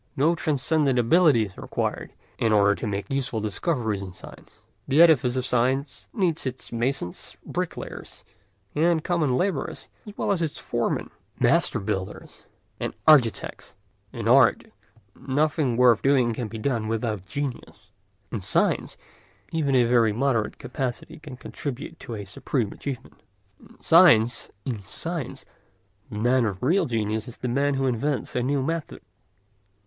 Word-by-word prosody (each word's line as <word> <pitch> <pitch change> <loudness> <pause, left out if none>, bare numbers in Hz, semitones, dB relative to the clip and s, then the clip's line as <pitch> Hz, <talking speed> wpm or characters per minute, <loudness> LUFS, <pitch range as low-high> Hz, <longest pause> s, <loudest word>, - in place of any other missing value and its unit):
No 155 +5 +4
transcendent 150 -3 +1
ability 130 -1 +4
is 95 - -12
required - - -3 0.3
in 115 - +2
order 100 -1 +5
to 110 - -5
make 100 +3 -4
useful 135 -4 -1
discoveries 110 - -1
in 95 -2 -7
science; - - -14 0.3
the 140 - +2
edifice 145 -7 +6
of 130 -1 -1
science 130 +3 -1
needs 175 - 0
its 130 0 -6
masons, 120 -6 -3
bricklayers, - - -6 0.5
and 160 +1 +2
common 155 -8 +1
labourers 185 -3 -2 0.2
as 210 - -10
well - - 0
as 190 -4 0
its 160 -3 -2
foremen, - - -2 0.3
master - - +2
builders, 95 -2 -5 0.3
and - - -3
architects. 125 - +3 0.4
In 115 -3 -4
art 125 0 +5 0.5
nothing 145 -2 0
worth 125 -3 +5
doing 130 -4 +3
can 115 0 -4
be 115 - -7
done 115 -1 -1
without 110 -4 -2
genius; 125 -7 -6 0.4
in 115 - -3
science - - 0 0.5
even 145 -4 +1
a 125 - +5
very 115 -2 +3
moderate 120 -2 0
capacity 130 +3 -5
can 150 -5 -10
contribute 140 +4 -6
to 115 - -7
a 100 -1 -6
supreme 105 +3 -2
achievement. 135 -4 -7 0.4
In - - -19
science 125 -10 +5 0.2
the 130 - -5 0.6
man 120 +4 +2
of 100 -2 -4
real 175 +9 +3
genius 110 -2 -2
is 120 - -9
the 125 - -4
man 140 +3 +1
who 135 0 0
invents 130 +3 -1
a 125 - +1
new 135 +2 0
method. 165 +1 -4
125 Hz, 145 wpm, -25 LUFS, 110-145 Hz, 0.6 s, edifice